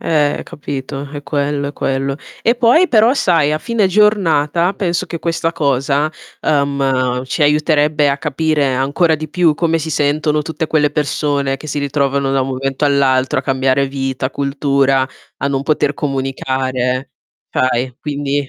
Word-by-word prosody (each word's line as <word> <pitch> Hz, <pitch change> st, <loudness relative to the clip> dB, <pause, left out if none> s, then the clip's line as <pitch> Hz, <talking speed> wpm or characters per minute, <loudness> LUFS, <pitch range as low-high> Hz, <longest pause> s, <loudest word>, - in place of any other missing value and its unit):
Eh, 150 Hz, -3 st, +1 dB
capito, 140 Hz, -3 st, -6 dB
è 145 Hz, -, -6 dB
quello, 145 Hz, -1 st, -1 dB
è -, -, -7 dB
quello. 135 Hz, 0 st, -2 dB, 0.3 s
E 235 Hz, +2 st, +2 dB
poi 255 Hz, +10 st, +4 dB
però, 230 Hz, +3 st, +4 dB
sai, 165 Hz, -, +2 dB
a 155 Hz, -, 0 dB
fine 230 Hz, +2 st, 0 dB
giornata 185 Hz, -4 st, +2 dB
penso 180 Hz, -1 st, -1 dB
che 165 Hz, 0 st, -6 dB
questa 165 Hz, 0 st, -1 dB
cosa, 140 Hz, +1 st, 0 dB, 0.3 s
uhm, 135 Hz, -3 st, 0 dB
ci 150 Hz, +4 st, -2 dB
aiuterebbe 150 Hz, 0 st, +3 dB
a 140 Hz, -, -1 dB
capire 155 Hz, -1 st, 0 dB
ancora 145 Hz, +6 st, +2 dB
di 155 Hz, 0 st, -5 dB
più 170 Hz, -4 st, +2 dB
come 165 Hz, +1 st, +1 dB
si 160 Hz, 0 st, -4 dB
sentono 150 Hz, +1 st, +1 dB
tutte 160 Hz, +1 st, -3 dB
quelle 150 Hz, -2 st, +2 dB
persone 145 Hz, -1 st, -1 dB
che 155 Hz, -, -10 dB
si 145 Hz, -, -2 dB
ritrovano 140 Hz, -1 st, 0 dB
da 135 Hz, -, +2 dB
un 130 Hz, -, -1 dB
momento 135 Hz, +2 st, -2 dB
all'altro 135 Hz, -2 st, +2 dB
a -, -, -2 dB
cambiare 135 Hz, 0 st, +1 dB
vita, 135 Hz, -1 st, -3 dB
cultura, 140 Hz, -1 st, +1 dB, 0.3 s
a -, -, -2 dB
non 135 Hz, -1 st, -1 dB
poter 145 Hz, -1 st, +1 dB
comunicare, 130 Hz, -2 st, -2 dB, 0.4 s
fai, 130 Hz, 0 st, 0 dB
quindi 145 Hz, -1 st, -2 dB
145 Hz, 155 wpm, -17 LUFS, 135-155 Hz, 0.4 s, poi